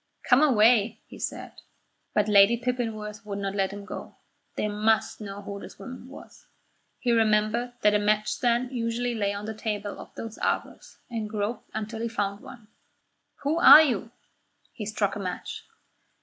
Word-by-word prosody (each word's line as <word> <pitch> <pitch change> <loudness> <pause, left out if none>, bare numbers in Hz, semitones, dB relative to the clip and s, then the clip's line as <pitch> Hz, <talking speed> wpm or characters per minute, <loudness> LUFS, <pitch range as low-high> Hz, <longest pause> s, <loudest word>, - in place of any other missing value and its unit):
"Come 255 +1 +5
away," 235 -5 +4
he - - -13
said. - - -6 0.5
But 210 0 +3
Lady 205 +2 +6
Pippinworth 225 -3 -3
would 205 -2 -5
not 195 -1 -3
let 195 -1 0
him 200 0 -8
go. - - -8 0.4
They - - -1
must 215 +2 +1
know 200 -1 -7
who 200 0 -6
this - - -11
woman 255 -1 -9
was. 270 - -14 0.5
He 245 - 0
remembered 225 +2 +2
that 210 0 +5
a 210 - +3
match 210 +1 +1
stand 245 +1 0
usually 240 0 -1
lay 205 -3 0
on 200 +1 -5
the 220 - -4
tables 210 -2 -4
of - - -11
those 225 -1 -7
arbours, - - -3
and 220 -2 -3
groped 210 +2 -3
until 220 +1 -4
he 235 - -1
found 205 -3 -2
one. 235 -4 -13 0.8
"Who 305 +4 +1
are 315 -2 +10
you?" 235 -6 -1 0.6
He 215 -5 -6
struck 210 -2 -1
a - - -5
match. 185 -2 -5
215 Hz, 170 wpm, -26 LUFS, 205-235 Hz, 0.8 s, are